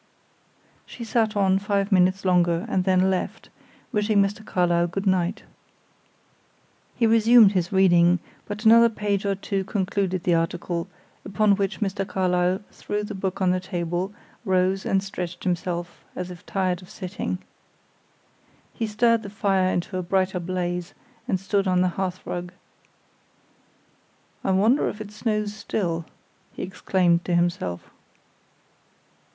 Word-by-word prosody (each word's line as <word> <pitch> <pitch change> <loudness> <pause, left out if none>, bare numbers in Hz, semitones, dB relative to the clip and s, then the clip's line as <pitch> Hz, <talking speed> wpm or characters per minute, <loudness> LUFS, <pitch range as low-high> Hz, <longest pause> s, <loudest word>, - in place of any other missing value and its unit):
She 240 - -8
sat 225 -2 0
on 190 -1 +3
five 200 0 -1
minutes 185 +1 +3
longer, 175 -1 +2
and 185 -1 0
then 190 0 +3
left, 185 - -3 0.4
wishing 210 0 +2
Mr. 200 +2 0
Carlyle 175 -3 +1
good 195 +4 -4
night. 185 -2 +1 1.5
He 235 - +2
resumed 225 -1 +6
his 180 -3 -1
reading; 175 -2 +5 0.3
but 210 +2 -6
another 230 +1 +7
page 205 -2 -2
or 200 - +1
two 195 0 -2
concluded 190 -2 -1
the 175 - +2
article, 170 +1 -1 0.4
upon 200 +1 +2
which 195 +2 -2
Mr. 195 -1 -1
Carlyle 185 0 0
threw 210 0 -4
the 210 - -5
book 190 -1 -3
on 180 - +3
the 185 - +1
table, 175 0 -3 0.3
rose 190 -1 +1
and 195 0 +1
stretched 180 -3 -6
himself, 175 -1 -3
as 180 0 -5
if 180 +2 -11
tired 185 -2 -1
of 180 - -15
sitting. 185 -1 -4 1.4
He 225 - -2
stirred 230 +2 +2
the 205 - -8
fire 195 -2 +1
into 185 +2 -2
a - - -1
brighter 185 +1 0
blaze, 180 0 -3 0.3
and 190 - 0
stood 195 +1 0
on 180 -1 +3
the 185 - +3
hearthrug. 180 -1 -4 1.9
"I - - -1
wonder 210 +9 +3
if 210 - -8
it 215 -1 -7
snows 210 -1 -2
still?" 180 -6 -2 0.5
he - - -6
exclaimed 180 -2 +1
to 175 - 0
himself. 170 - -1
190 Hz, 140 wpm, -24 LUFS, 180-205 Hz, 1.9 s, another